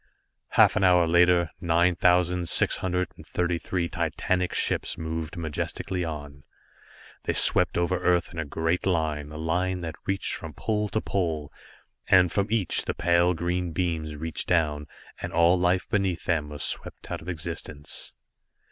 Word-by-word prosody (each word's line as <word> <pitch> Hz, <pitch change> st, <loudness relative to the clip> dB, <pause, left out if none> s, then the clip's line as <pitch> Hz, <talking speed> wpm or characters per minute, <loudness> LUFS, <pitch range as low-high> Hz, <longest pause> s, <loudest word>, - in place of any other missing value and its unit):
Half -, -, +6 dB
an 105 Hz, -, +1 dB
hour 90 Hz, -2 st, +5 dB
later, 85 Hz, 0 st, +4 dB
nine 85 Hz, +1 st, +3 dB
thousand 90 Hz, 0 st, +2 dB
six -, -, +5 dB
hundred 90 Hz, 0 st, -1 dB
and -, -, -12 dB
thirty 85 Hz, -1 st, -1 dB
three 85 Hz, -1 st, -2 dB
titanic 90 Hz, +2 st, -1 dB
ships -, -, 0 dB
moved 80 Hz, +1 st, -5 dB
majestically 85 Hz, +3 st, -3 dB
on. 75 Hz, -3 st, -7 dB, 0.8 s
They -, -, 0 dB
swept -, -, +5 dB
over 85 Hz, +1 st, 0 dB
Earth 90 Hz, 0 st, +1 dB
in 85 Hz, -, -6 dB
a -, -, 0 dB
great 80 Hz, +5 st, -1 dB
line, 80 Hz, -4 st, -1 dB
a 75 Hz, -, -8 dB
line 90 Hz, +3 st, -1 dB
that 80 Hz, -2 st, -5 dB
reached 95 Hz, 0 st, -1 dB
from -, -, -7 dB
pole 105 Hz, -1 st, -1 dB
to 110 Hz, -, -1 dB
pole, 80 Hz, -7 st, -2 dB, 0.5 s
and 90 Hz, -3 st, +5 dB
from 100 Hz, 0 st, 0 dB
each 110 Hz, -5 st, +1 dB
the -, -, -2 dB
pale 85 Hz, +1 st, +2 dB
green 90 Hz, 0 st, -2 dB
beams 80 Hz, -4 st, -2 dB
reached 80 Hz, 0 st, -3 dB
down, 75 Hz, -4 st, +1 dB, 0.3 s
and -, -, -4 dB
all 85 Hz, +1 st, +4 dB
life 90 Hz, 0 st, +1 dB
beneath 95 Hz, -4 st, -1 dB
them 80 Hz, -4 st, 0 dB
was 75 Hz, -1 st, -5 dB
swept -, -, -3 dB
out -, -, -4 dB
of 85 Hz, -, -8 dB
existence. 80 Hz, -3 st, -3 dB
85 Hz, 165 wpm, -26 LUFS, 80-90 Hz, 0.8 s, Half